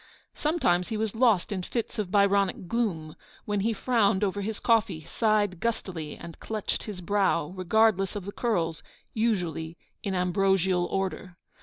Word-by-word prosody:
Sometimes 240 - +1
he 220 - -3
was 220 -1 -1
lost 225 -5 +3
in 190 -2 -2
fits 225 +4 -4
of 205 -4 -2
Byronic 200 -2 +2
gloom, 170 -9 -2 0.3
when 205 -1 -1
he 220 +4 +1
frowned 215 -3 +2
over 200 0 0
his 215 +1 -3
coffee, 215 -9 +1
sighed 210 -3 +1
gustily, 180 -9 -3
and 170 -1 -10
clutched 215 -2 -3
his 205 -4 -6
brow, 185 -4 +1
regardless 195 +1 +2
of 200 -3 -5
the 200 - -5
curls, 170 -10 -1 0.3
usually 175 -7 -1 0.2
in 195 -4 -2
ambrosial 180 0 +2
order. 190 -1 -3
195 Hz, 150 wpm, -27 LUFS, 180-220 Hz, 0.3 s, lost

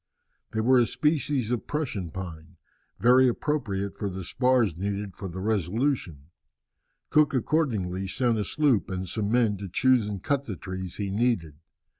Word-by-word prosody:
They 110 - -1
were 130 +3 +5
a 120 - +3
species 145 -4 0
of 125 - -2
Prussian 120 - -3
pine, 85 -1 -8 0.4
very 125 +2 +5
appropriate 115 -7 -1
for 100 - -3
the 95 0 -6
spars 125 -2 +2
needed 100 0 -3
for 100 - -6
the 90 0 -7
Resolution. 100 - -1 0.8
Cook 150 -1 +4
accordingly 110 - 0
sent 120 +2 +1
a - - +1
sloop 135 +1 +1
and 95 0 -3
some 105 +3 -2
men 115 -4 +2
to 100 0 -7
choose 125 +2 +3
and 100 -3 -5
cut 140 -1 0
the 105 - -5
trees 95 -1 -6
he 100 -2 -3
needed. 100 - 0
105 Hz, 160 wpm, -27 LUFS, 95-130 Hz, 0.8 s, were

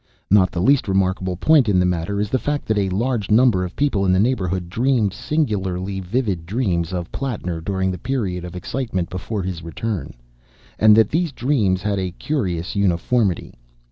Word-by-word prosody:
Not 95 -3 +5
the 85 - -2
least 140 +1 +3
remarkable 95 -1 0
point 140 - +4
in 95 - +3
the 90 - +3
matter 90 +3 -1
is 105 0 -2
the 130 - +2
fact 145 +2 -2
that 110 - 0
a 95 -1 0
large 110 +2 -1
number 110 -4 +4
of 90 - -6
people 140 -9 +1
in 95 - +2
the 95 - +3
neighbourhood 95 -6 0
dreamed 115 0 +1
singularly 95 - -2
vivid 95 -4 -2
dreams 90 -6 -1
of 90 -2 -4
Plattner 95 -11 -3
during 95 +1 -1
the 90 - -6
period 100 -8 -2
of 90 0 -8
excitement 95 -3 -3
before 95 +3 -4
his 90 -2 -4
return, 85 - -4 0.6
and 110 -1 +7
that 110 -1 +4
these 165 0 0
dreams 110 -9 0
had 100 -2 0
a 90 -2 -3
curious 95 - -2
uniformity. 100 +1 +1
95 Hz, 180 wpm, -21 LUFS, 90-120 Hz, 0.6 s, and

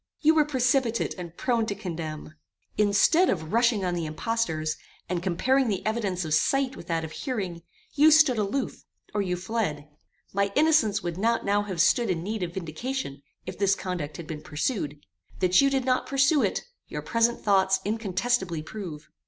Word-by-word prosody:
"You 315 +1 +5
were 310 -2 +4
precipitate 255 -4 +1
and 170 -1 -8
prone 235 -3 0
to 200 - -2
condemn. 160 -6 -6 0.4
Instead 210 - +4
of 160 -1 -2
rushing 230 -4 +3
on 180 - 0
the 170 -2 -2
impostors, 155 -3 -1 0.3
and 175 -1 -2
comparing 250 +9 +1
the 200 -4 -2
evidence 205 -5 -1
of 155 - -2
sight 270 - +2
with 170 - -11
that 165 -2 -1
of 160 - -6
hearing, 190 - -4 0.3
you 300 +1 +6
stood 305 -6 +5
aloof, 210 +7 -2 0.3
or 210 - +1
you 180 -2 -1
fled. 180 -7 -2 0.5
My 200 0 +1
innocence 295 -10 +3
would 175 0 -4
not 230 +3 +1
now 205 +1 +2
have 195 -4 -5
stood 200 +6 +3
in 170 -3 -1
need 215 +2 -3
of 175 -1 -4
vindication, 185 - -4 0.2
if - - -7
this 195 -1 +3
conduct 170 -7 -4
had 170 - -7
been 155 -1 -6
pursued. 150 - -3 0.4
That 185 +3 +4
you 275 - +4
did 270 -2 0
not 255 -1 +1
pursue 275 +2 +3
it, - - 0 0.2
your - - -6
present 230 0 +1
thoughts 190 -2 +3
incontestibly 200 -4 -1
prove. 160 -5 -8
200 Hz, 175 wpm, -26 LUFS, 170-245 Hz, 0.5 s, you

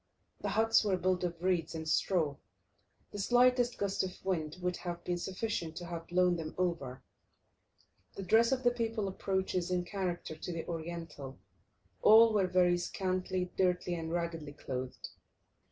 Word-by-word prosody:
The - - -2
huts 225 +1 +4
were 195 -3 +1
built 185 0 0
of 170 -1 -3
reeds 175 -3 0
and 160 0 -5
straw; 160 -3 +1 0.8
the 205 - -6
slightest 245 +3 +3
gust 200 -1 0
of 185 0 -7
wind 160 -4 -1
would 180 0 -1
have 175 -1 -5
been 175 -1 -2
sufficient 185 -3 -3
to 175 +1 -6
have 170 -1 -6
blown 180 0 +3
them 160 -1 -6
over. 170 -8 -2 1.1
The 195 - -5
dress 225 +6 +4
of 260 -1 0
the 245 - +5
people 225 -3 -2
approaches 190 -2 -1
in 180 -1 0
character 180 -4 -3
to 170 - -6
the 165 -1 -4
Oriental; 165 -5 -6 0.6
all 225 +1 +8
were 195 -3 +3
very 180 -1 +3
scantily, 185 0 -2
dirtily, 180 -1 +1
and 165 -1 -4
raggedly 165 -3 -3
clothed. 130 -3 -5
180 Hz, 155 wpm, -32 LUFS, 170-195 Hz, 1.1 s, all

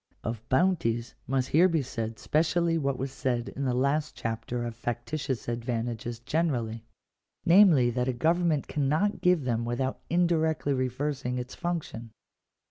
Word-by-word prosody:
Of 115 -1 -3
bounties 130 -7 +1
must 130 -1 0
here 175 +5 +5
be 160 -4 +1
said 115 -3 -4
specially 165 +2 +1
what 140 -4 0
was 135 +1 -3
said 125 -3 -2
in 140 - -4
the 125 - +1
last 140 +4 0
chapter 115 +2 -3
of 115 -1 -5
factitious 120 +3 -3
advantages 120 -1 -3
generally; 120 -4 -1 0.6
namely, 165 -9 +6
that 125 +1 -1
a 130 - +1
government 160 +2 +1
cannot 155 +8 0
give 180 -4 +3
them 120 -2 0
without 125 +3 -2
indirectly 160 -4 +2
reversing 130 0 -2
its 125 +1 -5
function. 155 -10 -4
130 Hz, 140 wpm, -28 LUFS, 120-160 Hz, 0.6 s, namely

